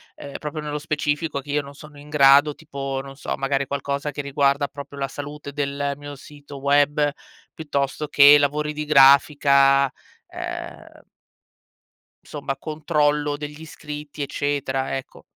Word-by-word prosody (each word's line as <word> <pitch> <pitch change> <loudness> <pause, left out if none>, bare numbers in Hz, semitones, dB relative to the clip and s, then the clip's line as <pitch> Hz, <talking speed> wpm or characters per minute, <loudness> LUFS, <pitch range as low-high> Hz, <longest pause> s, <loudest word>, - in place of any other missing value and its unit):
ehm, 140 - -9
proprio 150 0 -5
nello 150 0 -4
specifico 150 0 -2
che 145 +1 -8
io 145 +1 +1
non 140 0 -12
sono 150 0 -13
in 145 +1 -14
grado, 145 0 +5
tipo, 135 -3 -5
non 135 0 -11
so, 140 - -4
magari 135 0 -1
qualcosa 140 +1 -3
che 145 -1 -5
riguarda 140 0 +1
proprio 140 0 -10
la 135 0 -2
salute 145 +1 -8
del 140 0 -2
mio 145 0 -9
sito 145 +1 -12
web, 145 +1 +2 0.4
piuttosto 145 -1 -3
che 145 0 +7
lavori 150 +1 0
di 150 0 -4
grafica, 140 0 +5 0.5
ehm - - -8 1.2
somma 140 -2 -5
controllo 150 -1 0
degli 150 +1 -8
iscritti, 150 -1 -8
eccetera, 135 -2 -2
ecco. 135 - -11
145 Hz, 140 wpm, -22 LUFS, 140-150 Hz, 1.2 s, che